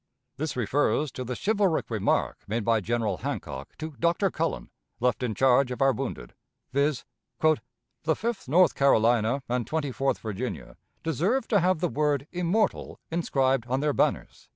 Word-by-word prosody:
This 155 Hz, +2 st, -3 dB
refers 140 Hz, +4 st, +1 dB
to 130 Hz, -, -5 dB
the 125 Hz, 0 st, -4 dB
chivalric 200 Hz, -, +1 dB
remark 110 Hz, -3 st, 0 dB
made 110 Hz, +1 st, -2 dB
by 115 Hz, -1 st, +3 dB
General 110 Hz, -2 st, -1 dB
Hancock 65 Hz, -1 st, -5 dB
to 155 Hz, +1 st, -5 dB
Dr. 170 Hz, +3 st, +2 dB
Cullen, -, -, -2 dB, 0.3 s
left 125 Hz, +1 st, +1 dB
in 120 Hz, -4 st, -1 dB
charge 130 Hz, 0 st, +4 dB
of 125 Hz, -, -5 dB
our 135 Hz, -1 st, +5 dB
wounded, 130 Hz, -, -5 dB, 0.4 s
viz., 140 Hz, 0 st, +1 dB, 0.3 s
"The 155 Hz, 0 st, -1 dB
Fifth 230 Hz, -, -3 dB
North 180 Hz, +5 st, +5 dB
Carolina 120 Hz, -1 st, +3 dB
and 120 Hz, -1 st, -1 dB
Twenty 155 Hz, -3 st, -1 dB
fourth 135 Hz, +2 st, 0 dB
Virginia 110 Hz, +3 st, -5 dB, 0.3 s
deserve 185 Hz, -, 0 dB
to 205 Hz, -, +4 dB
have 180 Hz, -2 st, +1 dB
the 175 Hz, -, +2 dB
word 145 Hz, -3 st, 0 dB
immortal 180 Hz, +5 st, 0 dB
inscribed 135 Hz, -7 st, +1 dB
on 130 Hz, +1 st, 0 dB
their 150 Hz, -1 st, +1 dB
banners." -, -, -1 dB
135 Hz, 155 wpm, -27 LUFS, 120-160 Hz, 0.4 s, our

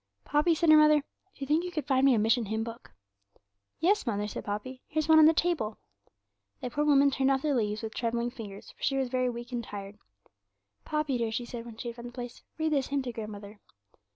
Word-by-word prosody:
'Poppy,' 300 Hz, +3 st, +3 dB
said 325 Hz, 0 st, +4 dB
her 310 Hz, -, +9 dB
mother, 305 Hz, -1 st, +6 dB
'do -, -, -33 dB, 0.4 s
you -, -, -1 dB
think 305 Hz, +5 st, +2 dB
you 360 Hz, -, -3 dB
could 310 Hz, -6 st, -4 dB
find 265 Hz, -2 st, +2 dB
me 270 Hz, -3 st, +6 dB
a -, -, +1 dB
Mission 225 Hz, +1 st, +2 dB
Hymn 220 Hz, +2 st, -1 dB
book?' 230 Hz, +1 st, -9 dB, 0.9 s
'Yes, 380 Hz, -3 st, +2 dB
mother,' 210 Hz, -2 st, -1 dB
said -, -, -6 dB
Poppy; 215 Hz, +6 st, -5 dB
'here's 310 Hz, 0 st, -1 dB
one 320 Hz, -1 st, +7 dB
on 310 Hz, -, +8 dB
the -, -, +7 dB
table.' 320 Hz, -11 st, 0 dB, 0.8 s
The 250 Hz, -, -5 dB
poor 295 Hz, +4 st, 0 dB
woman 280 Hz, -1 st, +5 dB
turned 270 Hz, 0 st, +1 dB
over 270 Hz, +2 st, +1 dB
the -, -, +2 dB
leaves 215 Hz, -2 st, -1 dB
with 220 Hz, 0 st, -5 dB
trembling 235 Hz, 0 st, -1 dB
fingers, 210 Hz, -6 st, -9 dB
for -, -, -27 dB
she 275 Hz, -, +1 dB
was 265 Hz, -2 st, 0 dB
very 255 Hz, 0 st, +1 dB
weak 240 Hz, +1 st, -7 dB
and 240 Hz, -1 st, -3 dB
tired. 200 Hz, -1 st, -8 dB, 0.9 s
'Poppy, 300 Hz, -4 st, -1 dB
dear,' 230 Hz, -1 st, -1 dB
she 240 Hz, +2 st, -3 dB
said, 235 Hz, -1 st, -7 dB
when 225 Hz, -2 st, -10 dB
she 240 Hz, -, -5 dB
had 235 Hz, -, -9 dB
found 240 Hz, 0 st, -7 dB
the -, -, -9 dB
place, 245 Hz, -1 st, -7 dB, 0.2 s
'read 315 Hz, -1 st, 0 dB
this 275 Hz, -3 st, +1 dB
hymn 280 Hz, -1 st, -1 dB
to 245 Hz, -2 st, -5 dB
grandmother.' 210 Hz, -2 st, -8 dB
250 Hz, 235 wpm, -29 LUFS, 225-295 Hz, 0.9 s, her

